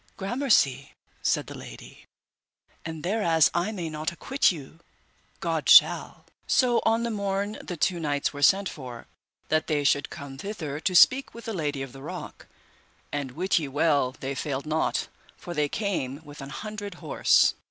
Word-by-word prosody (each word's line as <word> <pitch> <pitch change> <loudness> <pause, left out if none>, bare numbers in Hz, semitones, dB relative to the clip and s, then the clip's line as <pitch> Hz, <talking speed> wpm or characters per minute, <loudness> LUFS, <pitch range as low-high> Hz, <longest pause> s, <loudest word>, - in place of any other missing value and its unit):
Gramercy 195 - +1 0.3
said - - +1
the - - -9
lady, - - -12 0.8
and 160 -1 -6
thereas 175 -5 +3
I 175 +5 0
may 180 -6 -4
not 155 0 -3
acquit 265 +10 +1
you, 155 -1 -10 0.6
God - - -1
shall. - - +6 0.2
So 245 -2 +3
on 225 +1 +2
the 235 - -1
morn 200 0 -2
the 180 - -6
two 175 +3 +1
knights 145 -3 -1
were 145 - -7
sent 195 +6 +4
for, 125 -7 -8 0.4
that 155 0 +1
they 150 -2 0
should 145 0 +2
come 140 -4 -9
thither 160 -8 -5
to 180 +3 -1
speak 260 +9 +5
with 235 - -10
the 225 - -3
Lady 145 -6 -2
of 130 -2 -9
the 135 - -11
Rock, - - -8 0.6
and 140 -3 -3
wit 185 +4 +1
ye 150 - -4
well 140 -2 +1
they 135 +1 -3
failed 140 0 -3
not, 155 +1 0 0.3
for 175 - -7
they 150 -2 0
came 160 - -3
with 145 0 -11
an 135 - -7
hundred 205 +4 -6
horse. 150 - +3
160 Hz, 170 wpm, -26 LUFS, 145-200 Hz, 0.8 s, shall